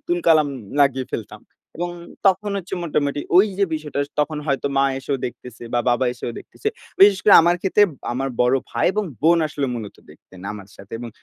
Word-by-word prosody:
তুল 175 - 0
কালাম 155 -3 +5 0.3
লাগিয়ে 135 -2 +2
ফেলতাম - - -6 0.4
এবং 175 +2 -3 0.4
তখন 195 +2 +2
হচ্ছে 190 0 -5
মোটামুটি 145 -3 -1 0.2
ওই 190 +4 +7
যে 200 - +4
বিষয়টা, 155 -2 -5 0.2
তখন 150 +1 -1
হয়তো 140 -1 0
মা 135 - +4
এসেও 135 +1 -2
দেখতেছে 120 -1 -10
বা 120 - +3
বাবা 120 +2 +1
এসেও 120 -1 -6
দেখতেছে। 430 - -5 0.3
বিশেষ 195 0 +7
করে 205 - +7
আমার 175 +1 +3
ক্ষেত্রে, 200 +2 +3 0.3
আমার 135 +2 -2
বড় 125 +2 +4
ভাই 120 - 0
এবং 210 +2 -1 0.2
বোন 170 +2 +5
আসলে 145 -2 -2
মূলত 110 -4 -7
দেখতেন 95 - -17
আমার 100 -2 -10
সাথে 100 - -15
এবং 120 0 -7
145 Hz, 185 wpm, -21 LUFS, 125-175 Hz, 0.4 s, ওই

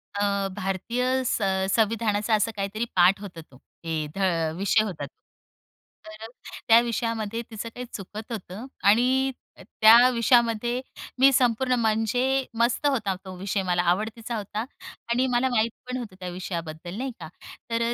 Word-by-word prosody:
अ, 200 -1 0
भारतीय 235 +7 -1
सं 190 -5 0
संविधानाचा 220 -1 +1
असा 215 +2 +1
काहीतरी 205 +3 -2
पाठ 180 +2 +5
होता 180 -5 -8
तो. 135 -4 -19 0.2
ए 160 -2 -2
ध - - -9 0.4
विषय 205 +3 +3
होता. 195 -7 -5 1.0
तर 215 +1 -9 0.4
त्या 230 0 +8
विषयामध्ये 230 -1 -2
तिचं 220 +1 -6
काही 245 +2 -8
चुकत 210 +3 -8
होतं. 210 +2 -6 0.2
आणि 260 +5 +4 0.5
त्या 235 +3 +8
विषयामध्ये 240 0 +2 0.4
मी 270 +1 +7
संपूर्ण 255 0 +2
म्हणजे 245 +4 +1
मस्त 240 +5 +2
होता 215 -9 0
तो 185 -1 -8
विषय 195 +1 -2
मला 175 -1 +1
आवडतीचा 220 +5 -2
होता. 210 +1 -4 0.5
आणि 250 +2 +2
मला 250 +2 +2
माहीत 230 -2 +1 0.2
पण 255 - -2
होतं 225 -7 -7
त्या 180 -1 -5
विषयाबद्दल 175 -1 -6
नाही 260 +2 -3
का. 160 - -7 0.4
तर 230 0 0
अ, - - 0
220 Hz, 145 wpm, -25 LUFS, 195-240 Hz, 1.0 s, त्या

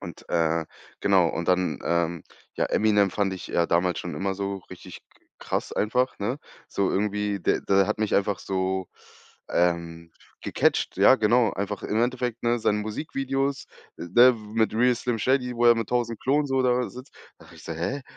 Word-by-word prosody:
Und, - - -10
äh 80 -1 +1 0.4
genau 95 -4 +4
und 85 +1 -4
dann, 90 0 +1
ähm, 85 -1 0 0.3
ja, - - 0
„Eminem" 105 -2 +2
fand 100 -1 -1
ich 95 -2 -7
ja 85 - +1
damals 90 +1 +1
schon 90 - -5
immer 95 0 -2
so 100 0 -3
richtig - - -11
k - - -49 0.3
krass - - -3
einfach, 125 +4 0
ne? 120 +7 -2 0.3
So 100 - 0
irgendwie, 105 0 -1
der - - +1
der 95 -1 +2
hat 105 - -2
mich 110 -1 0
einfach 100 -1 +1
so, 95 -1 -2 0.6
ähm, 85 -1 -1 0.3
gecatcht, - - 0
ja, - - +7
genau, 115 +1 +3
einfach 100 +1 -4
im 110 - -1
Endeffekt, 125 -1 -2
ne, 120 0 +1
seine 105 -2 +1
Musikvideos, 135 +5 -3 0.3
ne, 120 +9 +5 0.2
mit 110 -1 +1
„Real 125 +2 +3
Slim 120 0 -2
Shady", 125 +2 +1
wo 120 +1 +3
er 120 - +8
mit 115 -2 -3
1.000 120 -2 -1
Klonen 145 +3 +1
so 135 -1 +1
da 125 -1 +1
sitzt. 125 +2 -12 0.3
Dachte - - -17
habe - - -16
ich - - -14
gesagt: 80 -1 -6
„Hä?“ 140 +11 -2
105 Hz, 185 wpm, -25 LUFS, 95-125 Hz, 0.6 s, er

